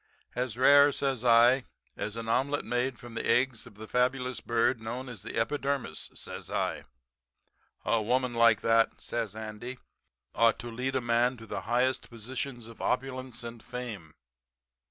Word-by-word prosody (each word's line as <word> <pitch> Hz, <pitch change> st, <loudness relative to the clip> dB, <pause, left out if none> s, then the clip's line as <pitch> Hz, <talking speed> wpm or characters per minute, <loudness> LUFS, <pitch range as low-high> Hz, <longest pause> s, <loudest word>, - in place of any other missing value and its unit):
"'As 125 Hz, -2 st, -2 dB
rare,' 140 Hz, +2 st, +7 dB
says 135 Hz, -4 st, -1 dB
I, 120 Hz, +2 st, +6 dB, 0.3 s
'as 105 Hz, +1 st, -4 dB
an 115 Hz, -1 st, -5 dB
omelet 135 Hz, +5 st, +1 dB
made 120 Hz, +1 st, -1 dB
from 120 Hz, -2 st, -11 dB
the -, -, -3 dB
eggs 125 Hz, -2 st, +2 dB
of 110 Hz, -, -15 dB
the 110 Hz, +1 st, -9 dB
fabulous 125 Hz, +1 st, 0 dB
bird 115 Hz, +1 st, +1 dB
known 120 Hz, +4 st, -5 dB
as 120 Hz, -6 st, -8 dB
the 115 Hz, -, -7 dB
epidermis,' 140 Hz, -, -1 dB
says -, -, -7 dB
I. -, -, -2 dB, 1.0 s
"'A 115 Hz, -, +2 dB
woman 125 Hz, +3 st, +1 dB
like 115 Hz, -2 st, +5 dB
that,' 115 Hz, 0 st, +3 dB
says 115 Hz, -4 st, -3 dB
Andy, 110 Hz, +3 st, -6 dB, 0.6 s
'ought 115 Hz, 0 st, +4 dB
to 120 Hz, 0 st, -7 dB
lead 130 Hz, +3 st, -2 dB
a 130 Hz, -, +2 dB
man 120 Hz, +2 st, +2 dB
to 115 Hz, -, -11 dB
the -, -, -4 dB
highest 125 Hz, +2 st, +1 dB
positions 120 Hz, +1 st, -5 dB
of 115 Hz, 0 st, -12 dB
opulence 130 Hz, -2 st, -2 dB
and 115 Hz, -1 st, -7 dB
fame.' 115 Hz, -10 st, -7 dB
120 Hz, 160 wpm, -29 LUFS, 115-130 Hz, 1.0 s, rare